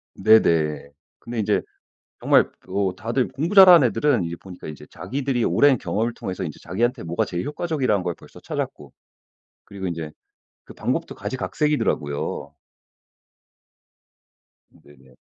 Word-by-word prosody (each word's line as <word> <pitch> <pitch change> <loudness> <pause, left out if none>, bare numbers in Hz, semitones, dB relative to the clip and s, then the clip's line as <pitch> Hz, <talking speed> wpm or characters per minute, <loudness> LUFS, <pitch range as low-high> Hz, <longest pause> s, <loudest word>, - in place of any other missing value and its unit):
네네. 80 -9 +3 0.3
근데 120 -1 -6
인제 105 - +1 0.6
정말 - - +4 0.2
어 95 -1 -1
다들 120 +5 -1
공부 165 +8 -3
잘하는 180 -9 +9
애들은 115 -3 +1
이제 85 +1 -5
보니까 90 0 -12
인제 75 - -9
자기들이 125 +7 -2
오랜 140 -3 +4
경험을 115 +3 -1
통해서 95 -3 -5
인제 75 -4 -7
자기한테 120 +8 -1
뭐가 85 +1 -1
제일 90 -1 -4
효과적이라는 145 - -1
걸 90 -1 -2
벌써 - - -16
찾았고 - - -5 0.7
그리고 95 -1 -7
인제 85 -3 -4 0.5
그 - - -13
방법도 - - -3
가지각색이더라고요. 105 - -2 2.1
네네. 65 -3 -21
105 Hz, 315 characters per minute, -23 LUFS, 85-130 Hz, 2.1 s, 잘하는